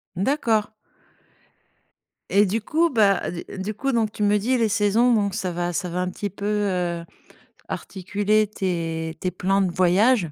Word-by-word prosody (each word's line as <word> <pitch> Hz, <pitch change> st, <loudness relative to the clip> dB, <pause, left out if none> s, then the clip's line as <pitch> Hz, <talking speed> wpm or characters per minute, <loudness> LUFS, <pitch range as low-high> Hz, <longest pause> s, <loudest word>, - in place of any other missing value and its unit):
D'accord. 220 Hz, -1 st, +1 dB, 1.6 s
Et 205 Hz, +1 st, +4 dB
du 215 Hz, +4 st, -1 dB
coup, 330 Hz, +8 st, +1 dB
bah, 205 Hz, -6 st, +2 dB
d 170 Hz, -, -7 dB
du 200 Hz, +3 st, -3 dB
coup 270 Hz, +5 st, -2 dB
donc 220 Hz, -2 st, +1 dB
tu 210 Hz, -, -8 dB
me 205 Hz, 0 st, +3 dB
dis 250 Hz, +5 st, +1 dB
les 225 Hz, -2 st, +2 dB
saisons, 215 Hz, +4 st, +3 dB
donc 200 Hz, -3 st, +1 dB
ça 185 Hz, -1 st, -2 dB
va 175 Hz, 0 st, -2 dB
ça 180 Hz, +1 st, -2 dB
va 180 Hz, +1 st, -2 dB
un 180 Hz, -, -1 dB
petit 205 Hz, +2 st, -4 dB
peu, 200 Hz, +2 st, -8 dB
heu, 180 Hz, -5 st, -1 dB, 0.6 s
articuler 205 Hz, +3 st, 0 dB
tes 165 Hz, -5 st, -3 dB
tes 185 Hz, -, -2 dB
plans 195 Hz, +2 st, +1 dB
de 185 Hz, -, +1 dB
voyage. 185 Hz, -, +3 dB
200 Hz, 170 wpm, -23 LUFS, 180-215 Hz, 1.6 s, Et